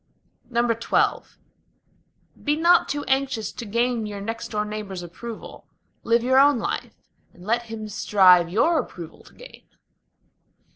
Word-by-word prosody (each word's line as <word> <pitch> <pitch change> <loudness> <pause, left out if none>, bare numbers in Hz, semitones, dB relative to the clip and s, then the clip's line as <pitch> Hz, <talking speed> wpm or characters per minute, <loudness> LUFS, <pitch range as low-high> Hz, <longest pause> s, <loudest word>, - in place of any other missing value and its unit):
XII 235 -1 +1 1.2
Be 295 0 +1
not 340 +3 +4
too 290 0 -2
anxious 265 -4 -1
to 235 - -8
gain 235 +1 0
your 205 -1 -6
next 225 +3 -5
door 210 -1 -2
neighbor's 210 -4 -6
approval: 215 +6 -9 0.3
Live 230 0 +2
your 260 +2 +4
own 285 -1 +5
life, 230 - -4 0.4
and 180 - -15
let 235 +3 0
him 220 -1 -6
strive 185 -4 +4
your 310 - +2
approval 170 - -8
to - - -18
gain. - - -14
230 Hz, 135 wpm, -23 LUFS, 210-255 Hz, 1.2 s, own